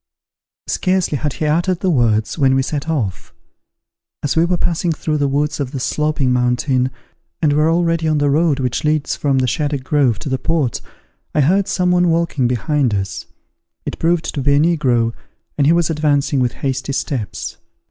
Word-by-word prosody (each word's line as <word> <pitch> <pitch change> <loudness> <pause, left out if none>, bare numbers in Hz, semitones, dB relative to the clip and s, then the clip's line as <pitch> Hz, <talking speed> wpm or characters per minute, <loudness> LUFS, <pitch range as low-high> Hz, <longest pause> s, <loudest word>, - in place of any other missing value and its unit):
Scarcely 185 -4 0
had 150 -3 -2
he 155 - -3
uttered 170 +4 +1
the 185 - +1
words, 115 -6 +1
when 135 -4 +3
we 135 - +2
set 145 +3 -4
off. 110 - -3 0.9
As 145 - 0
we 165 +1 +4
were 175 0 0
passing 170 0 0
through 155 -1 -2
the 145 - +2
woods 145 +3 -1
of 140 -1 -3
the 135 - -3
Sloping 150 -1 0
Mountain, 125 +1 +1 0.5
and 150 -3 +2
were 150 +2 +3
already 165 -1 +1
on 155 -1 +2
the 145 -1 +2
road 155 -1 +2
which 125 -2 -1
leads 150 -1 0
from 140 -2 0
the 130 - +2
Shaddock 145 +1 -1
Grove 130 -6 +2
to 140 - -6
the 130 -1 -1
port, 155 -8 -1 0.5
I 150 - +4
heard 190 +7 +2
some 180 -1 +1
one 180 -1 +3
walking 165 -6 +1
behind 130 -1 0
us. 95 -2 -4 0.6
It - - -5
proved 165 0 +1
to 145 - -2
be 140 +1 +3
a - - +4
negro, 130 -8 +2 0.4
and 140 -1 +2
he - - +5
was 170 -1 +2
advancing 145 -2 +1
with 125 -2 +1
hasty 135 +1 -2
steps. 130 -6 -4
145 Hz, 190 wpm, -18 LUFS, 130-165 Hz, 0.9 s, he